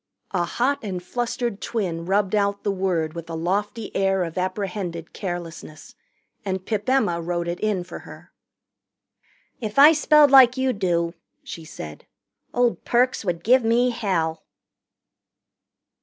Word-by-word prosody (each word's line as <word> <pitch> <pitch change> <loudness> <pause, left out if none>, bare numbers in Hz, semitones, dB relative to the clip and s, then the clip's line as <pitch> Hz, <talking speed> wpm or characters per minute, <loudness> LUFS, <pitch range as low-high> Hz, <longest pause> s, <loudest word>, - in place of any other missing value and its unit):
A 175 -3 0
hot 255 +10 0
and 185 -4 -5
flustered 240 0 -3
twin 175 -7 -3
rubbed 195 0 +1
out 200 -1 +1
the 205 - +1
word 180 -5 -1
with 170 -1 -8
a 165 - -4
lofty 205 +6 -2
air 195 -1 +2
of 165 -2 -6
apprehended 185 -2 -3
carelessness, 170 -4 -7 0.5
and 190 -2 -3
Pip 215 +1 -2
Emma 180 -11 +2
wrote 170 0 -2
it 175 +1 -3
in 210 -4 0
for 175 - -9
her. - - -13 1.3
"If 215 -1 -5
I 290 +3 +9
spelled 300 -2 +5
like 260 -2 +7
you 260 -1 +1
do," 170 -4 0 0.3
she 165 - -8
said, 75 - -9 0.4
"old 245 -1 +1
Perks 250 0 +1
would 170 -3 -2
give 255 +2 +4
me 240 +2 +3
hell." 165 -8 -1
195 Hz, 140 wpm, -23 LUFS, 170-235 Hz, 1.3 s, I